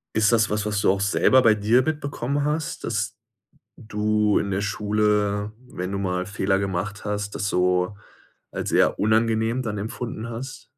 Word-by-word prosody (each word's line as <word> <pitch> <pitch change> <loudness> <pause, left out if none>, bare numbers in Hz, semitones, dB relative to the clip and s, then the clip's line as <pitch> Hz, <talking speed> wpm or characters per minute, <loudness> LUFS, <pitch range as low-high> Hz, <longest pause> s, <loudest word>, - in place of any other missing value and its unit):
Ist 110 +1 +4
das 110 -2 +4
was, 105 -1 0
was 105 -1 0
du - - +4
auch 95 0 -1
selber 130 +6 +4
bei 110 -3 +5
dir 110 +5 +3
mitbekommen 145 -1 -2
hast, 155 +1 -2
dass - - -2 0.6
d - - -14
du 105 0 +1
in 100 -1 -1
der 95 +1 0
Schule, 105 0 0
wenn 90 +2 -5
du 100 - -2
mal 90 -1 -1
Fehler 100 -1 0
gemacht 100 +1 -3
hast, 105 0 -3
das 100 - -2
so 90 +2 +1 0.6
als - - -4
eher - - +3
unangenehm 110 +3 +2
dann 105 -2 -3
empfunden 115 +1 -5
hast? 130 +2 -7
105 Hz, 175 wpm, -24 LUFS, 100-115 Hz, 0.6 s, bei